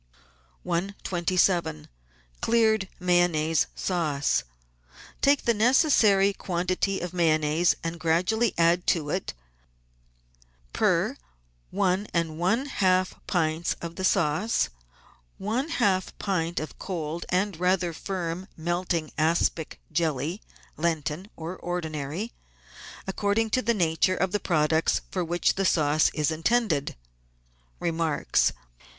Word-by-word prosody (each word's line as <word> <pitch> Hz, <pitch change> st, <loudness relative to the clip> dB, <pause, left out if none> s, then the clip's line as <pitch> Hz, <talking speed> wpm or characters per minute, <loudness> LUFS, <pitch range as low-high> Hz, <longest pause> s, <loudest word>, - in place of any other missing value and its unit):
127— 175 Hz, -, 0 dB, 0.6 s
CLEARED 220 Hz, -4 st, +2 dB
MAYONNAISE 175 Hz, -3 st, +2 dB
SAUCE 155 Hz, -, 0 dB, 0.8 s
Take 280 Hz, 0 st, +4 dB
the 235 Hz, -, +4 dB
necessary 215 Hz, -4 st, +4 dB
quantity 185 Hz, +1 st, -1 dB
of 175 Hz, 0 st, -5 dB
Mayonnaise 160 Hz, -1 st, +2 dB
and 165 Hz, 0 st, -4 dB
gradually 180 Hz, +8 st, +1 dB
add 170 Hz, +1 st, +3 dB
to 150 Hz, -4 st, +1 dB
it, 185 Hz, +2 st, -3 dB, 1.4 s
per -, -, +2 dB, 0.5 s
one 195 Hz, +1 st, 0 dB
and 165 Hz, -2 st, -1 dB
one 215 Hz, +10 st, +1 dB
half 185 Hz, -8 st, +1 dB
pints 165 Hz, -2 st, 0 dB
of 170 Hz, 0 st, -7 dB
the 190 Hz, -, -5 dB
sauce, 185 Hz, -, +2 dB, 0.7 s
one 235 Hz, +9 st, -2 dB
half 195 Hz, -, 0 dB
pint 175 Hz, -4 st, -1 dB
of 155 Hz, -, -7 dB
cold 170 Hz, -3 st, -4 dB
and 185 Hz, -1 st, 0 dB
rather 180 Hz, -1 st, +1 dB
firm 180 Hz, +1 st, -4 dB
melting 170 Hz, -1 st, -1 dB
aspic 160 Hz, 0 st, 0 dB
jelly 160 Hz, +2 st, -1 dB, 0.2 s
— -, -, -28 dB
Lenten 160 Hz, +3 st, -2 dB
or 165 Hz, +3 st, -6 dB
ordinary, 165 Hz, +3 st, -4 dB, 0.7 s
according 205 Hz, +3 st, 0 dB
to 255 Hz, -, +2 dB
the 235 Hz, +1 st, +1 dB
nature 170 Hz, 0 st, +2 dB
of 190 Hz, 0 st, 0 dB
the 210 Hz, -, 0 dB
products 160 Hz, -2 st, +1 dB
for 185 Hz, -, -1 dB
which 175 Hz, +1 st, +1 dB
the 195 Hz, -, -1 dB
sauce 155 Hz, -3 st, +3 dB
is 150 Hz, 0 st, +1 dB
intended. 165 Hz, -2 st, 0 dB, 0.8 s
Remarks. 165 Hz, -2 st, +1 dB
175 Hz, 110 wpm, -26 LUFS, 160-195 Hz, 1.4 s, Take